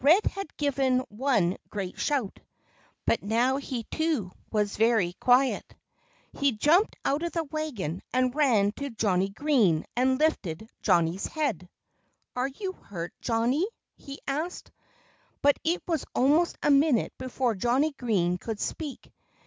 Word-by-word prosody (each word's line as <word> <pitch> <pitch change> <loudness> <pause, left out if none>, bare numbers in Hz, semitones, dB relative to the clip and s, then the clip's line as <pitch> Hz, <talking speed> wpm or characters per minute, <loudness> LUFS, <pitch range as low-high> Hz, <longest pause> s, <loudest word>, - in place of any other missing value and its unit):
Red 335 +9 +6
had 395 -6 -4
given 270 -3 +1
one 210 -6 +1
great 195 -3 -5
shout. 270 -9 -1 0.7
But 230 - +2
now 235 +6 +2
he 260 -4 -4
too 305 - -1 0.2
was 210 -2 0
very 220 -6 +3
quiet. 255 +6 +2 0.6
He 280 -2 +1
jumped 320 - +3
out 285 +3 +1
of 340 0 -3
the 330 - 0
wagon 275 - -4
and 255 0 +1
ran 240 -9 +3
to 280 0 -4
Johnnie 195 -5 +1
Green, 210 - +2
and 260 +1 +2
lifted 220 - 0
Johnnie's 170 +2 +2
head. 240 - -2 0.7
"Are 250 +1 0
you 375 +8 -5
hurt, 175 - -7
Johnnie?" 245 - +1 0.3
he 275 0 -9
asked. 310 +6 -3 0.7
But 285 0 +4
it 340 +3 0
was 325 -5 0
almost 300 +7 +3
a 295 - +4
minute 280 -4 +3
before 255 -2 -1
Johnnie 250 +9 +1
Green 180 -9 0
could 220 +1 -5
speak. 300 -5 -5
255 Hz, 140 wpm, -27 LUFS, 210-295 Hz, 0.7 s, Red